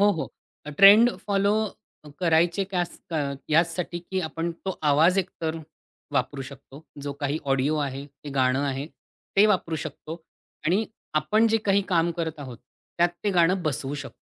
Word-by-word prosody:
हो, 205 +1 +6
हो. 155 - -2 0.4
A - - -5
trend 210 +5 +9 0.2
follow 200 0 +2 0.7
करायचे 170 +2 +2
कयास 175 -2 -1 0.2
अ, - - 0 0.3
याचसाठी, 170 +2 +1
की 185 +2 -4
आपण 165 +2 -3 0.2
तो 190 - -3
आवाज 165 +6 +4
एकतर 165 -3 -3 0.5
वापरू 135 +1 -1
शकतो, 140 +2 -12 0.2
जो 145 - -3
काही 145 +1 -1
ऑडिओ 135 +3 +1
आहे, 135 +1 -6
ते 140 +1 -13
गाणं 130 0 +2
आहे, 135 +2 -4 0.5
ते 205 +2 +7
वापरू 180 -6 +1
शकतो 165 +2 -8 0.4
आणि 195 +7 +2 0.3
आपण 215 +7 +2
जे 225 - +3
काही 200 0 +3
काम 170 -2 +2
करत 160 -2 -3
आहोत, 130 -4 -8 0.4
त्यात 175 +1 +5 0.2
ते 205 - +2
गाणं 180 0 +3
बसवू 145 -2 -2
शकतो. - - -12
165 Hz, 160 wpm, -25 LUFS, 145-190 Hz, 0.7 s, trend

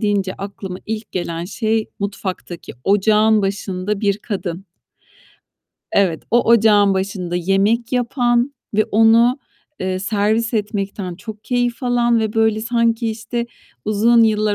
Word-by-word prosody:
deyince 200 -3 0
aklıma 195 -2 -7
ilk 220 0 -5
gelen 170 -2 -3
şey, 220 +2 -1
mutfaktaki 195 -3 -5
ocağın 210 +1 +3
başında 195 0 -2
bir 200 -1 +1
kadın. 190 -4 -5 1.3
Evet, 185 -5 +2
o 240 0 +4
ocağın 210 -3 +4
başında 190 -2 -2
yemek 200 +7 +1
yapan 245 +1 +1 0.2
ve 215 0 +3
onu, 230 +3 +4 0.4
eee, 185 0 -1
servis 215 +4 0
etmekten 200 -3 -3
çok 215 +3 -10
keyif 245 0 -1
alan 240 -1 +2
ve 220 -1 -1
böyle 220 -1 +2
sanki 230 0 +1
işte, 225 +2 -4 0.4
uzun 225 +3 +4
yıllar 215 -1 +2
215 Hz, 125 wpm, -19 LUFS, 195-230 Hz, 1.3 s, o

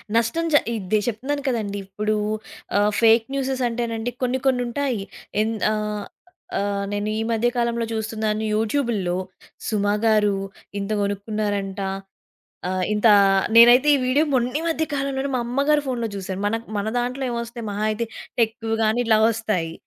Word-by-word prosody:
నష్టం 235 +9 +1
జ - - +4 0.2
ఇదే 210 0 0
చెప్తున్నాను 265 +6 -2
కదండి! 215 -5 -1
ఇప్పుడూ 210 +2 -1 0.6
ఆహ్, 205 +1 +3
ఫేక్ 225 0 +5
న్యూసెస్ 265 -1 -1
అంటేనండి 230 0 -2
కొన్ని 255 +1 +1
కొన్ని 255 -2 +3
ఉంటాయి. 250 -4 -1 0.4
ఎన్ 225 +1 0 0.2
ఆహ్, 210 -1 -2 0.6
ఆహ్, 200 0 -1
నేను 205 +1 -2
ఈ - - 0
మధ్య 230 +1 +2
కాలంలో 235 -1 0
చూస్తున్నాను 220 -1 -2
యూట్యూబు‌ల్లొ 215 -5 0 0.5
'సుమ' 205 -2 0 0.2
గారు 210 -2 +3 0.4
ఇంత 200 +2 -4
కొనుక్కున్నారంట. 200 -1 -2 0.9
ఆహ్, 185 0 0
ఇంత 210 +2 +3 0.5
నేనైతే 245 +4 +8
ఈ - - +4
వీడియో 275 +5 +3
మొన్ని 250 +4 +1
మధ్య 320 0 0
కాలంలోనే 275 0 -1
మా 250 - +1
అమ్మగారి 280 +4 +2
ఫోన్‌లో 245 -3 -1
జూశాను. 190 0 -4
మన 215 - +1 0.2
మన 200 - -2
దాంట్లో 250 +2 -2
ఏమొస్తాయి 235 0 -5
మహా 205 +1 -2
అయితే 225 +2 -1 0.4
టెక్‌వి 225 0 0
గాని 220 +2 +2
ఇలా 220 -1 +5
ఒస్తాయి. 215 -7 -2
225 Hz, 145 wpm, -23 LUFS, 210-245 Hz, 0.9 s, నేనైతే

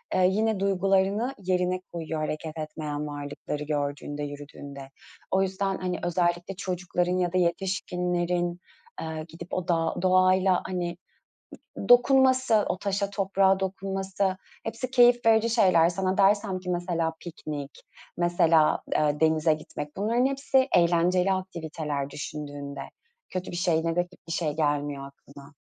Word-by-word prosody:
ııı, 185 - +4
yine 215 +2 +1
duygularını 195 +5 +1
yerine 185 -1 0
koyuyor. 160 -2 -4
Hareket 155 +1 -4
etmeyen 150 -1 -4
varlıkları 145 0 -5
gördüğünde, 145 0 -3
yürüdüğünde. 145 -1 -8 0.4
O 190 - +3
yüzden, 195 0 -1
hani, 180 -1 -3
özellikle 175 +1 0
çocukların 180 -1 -1
ya 180 -1 0
da 185 - +2
yetişkinlerin, 180 -1 -1 0.4
ııı, 160 -1 -5
gidip 170 +2 -10
o 185 -2 -2
dağ 165 -2 +1
doğayla 185 0 +4
hani 175 -2 -3 0.8
d - - -6
dokunması, 260 -3 +5
o 180 - -1
taşa 200 0 -1
toprağa 195 -1 +2
dokunması, 195 0 -2 0.3
hepsi 230 +3 -4
keyif 245 -2 +5
verici 225 +1 +4
şeyler. 185 -7 +5
Sana 185 +2 -1
dersem 200 -1 +3
ki 180 0 -6
mesela 175 -2 -1
piknik, 150 -4 -7 0.3
mesela, 170 -2 +3 0.2
ııı, 150 0 +1
denize 160 0 +3
gitmek, 150 -1 -8
bunların 230 +6 +2
hepsi 275 -1 +2
eğlenceli 180 +2 +3
aktiviteler 160 -6 -4
düşündüğünde. 145 -1 -6 0.5
Kötü 185 0 -4
bir 175 - -5
şey, 165 -2 +1
negatif 175 +2 -1
bir 165 - -5
şey 165 -3 0
gelmiyor 145 -2 -1
aklına. 140 +1 -15
180 Hz, 130 wpm, -27 LUFS, 155-195 Hz, 0.8 s, dokunması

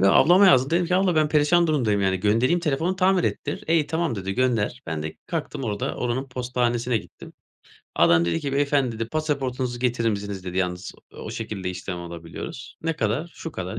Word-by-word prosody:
Yo 95 +1 +5
ablama 185 +4 +6
yazdım 130 -4 +5
dedim 175 +1 +2
ki, 180 - 0
"Abla 185 -3 +2
ben 155 -1 +3
perişan 155 +3 +3
durumdayım, 120 -10 +1
yani, 95 -1 +2
göndereyim 115 - +2
telefonu 165 +4 0
tamir 185 -1 +3
ettir." 145 - -3
"E 165 - +2
iyi 155 -3 +3
tamam" 160 -4 -1
dedi 95 -1 -3
"Gönder." 120 -3 0
Ben 80 -2 -3
de 80 0 -6
kalktım 150 -5 -4
orada 105 -2 -2
oranın 125 +3 -2
postanesine 125 -1 -1
gittim. - - -13 0.6
Adam 85 0 +5
dedi 85 - 0
ki; 140 -2 -3
"beyefendi" 140 -3 +1
dedi 115 - -3
"pasaportunuzu 130 -5 -2
getirir 120 -2 +1
misiniz" 100 -2 -4
dedi 90 0 -5
"Yalnız 90 -1 -2 0.3
o - - -6
şekilde 95 -3 -4
işlem 90 0 -5
alabiliyoruz." 85 +8 -8
"Ne 165 -1 -1
kadar?" 130 +11 -1
"Şu 165 - -7
kadar" 95 +4 -5
125 Hz, 190 wpm, -24 LUFS, 100-155 Hz, 0.6 s, ablama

